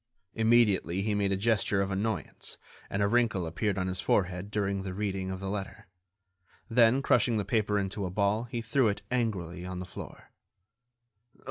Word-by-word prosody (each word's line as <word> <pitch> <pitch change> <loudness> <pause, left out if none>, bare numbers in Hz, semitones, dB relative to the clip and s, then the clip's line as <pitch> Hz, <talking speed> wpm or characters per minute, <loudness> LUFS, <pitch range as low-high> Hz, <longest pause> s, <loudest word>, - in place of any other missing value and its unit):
Immediately, 110 -5 +3
he 105 0 0
made 100 -1 +1
a 95 - +1
gesture 105 -1 +2
of 100 0 0
annoyance, 100 -1 -3 0.3
and 100 +1 0
a - - +3
wrinkle 110 -5 +2
appeared 95 +5 -1
on 95 - 0
his 95 0 -2
forehead 90 0 0
during 100 -2 -1
the 95 -1 -5
reading 95 -2 -2
of 95 0 -4
the 95 - -5
letter; 100 0 -5 0.8
then, 120 +3 +4
crushing 120 -3 +3
the 105 - -1
paper 105 0 +1
into 100 0 -2
a - - -4
ball, 100 +4 +1
he 120 -1 -4
threw 115 +2 +2
it, 100 - -2
angrily, 95 -8 -1
on 90 0 -5
the 90 - -5
floor. 90 - -10
100 Hz, 175 wpm, -29 LUFS, 95-110 Hz, 0.8 s, then